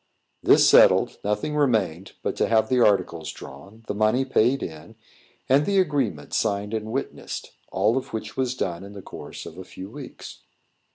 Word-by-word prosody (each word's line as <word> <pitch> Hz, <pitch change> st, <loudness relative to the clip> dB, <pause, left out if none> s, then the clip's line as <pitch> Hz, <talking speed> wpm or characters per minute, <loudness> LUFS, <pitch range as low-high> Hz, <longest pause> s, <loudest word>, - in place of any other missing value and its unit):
This -, -, +6 dB
settled, -, -, +5 dB
nothing 105 Hz, +9 st, -1 dB
remained 100 Hz, -, 0 dB
but -, -, -1 dB
to -, -, +2 dB
have 110 Hz, -1 st, +2 dB
the 130 Hz, -1 st, +2 dB
articles 90 Hz, -6 st, +1 dB
drawn, 95 Hz, +12 st, -12 dB
the -, -, -3 dB
money 110 Hz, +5 st, +2 dB
paid 130 Hz, 0 st, +2 dB
in, 80 Hz, +6 st, -8 dB, 0.5 s
and 135 Hz, +2 st, +4 dB
the 200 Hz, -1 st, +2 dB
agreement 135 Hz, -, 0 dB
signed 100 Hz, +1 st, 0 dB
and 110 Hz, 0 st, -3 dB
witnessed; 135 Hz, +3 st, -5 dB, 0.2 s
all 105 Hz, +6 st, +2 dB
of -, -, -12 dB
which 110 Hz, -1 st, -5 dB
was 130 Hz, -1 st, -1 dB
done 90 Hz, -7 st, -3 dB
in 100 Hz, +1 st, -10 dB
the 100 Hz, -2 st, -10 dB
course -, -, -9 dB
of 85 Hz, -, -10 dB
a -, -, -6 dB
few 95 Hz, +2 st, -10 dB
weeks. 140 Hz, 0 st, -10 dB
110 Hz, 175 wpm, -24 LUFS, 95-130 Hz, 0.5 s, This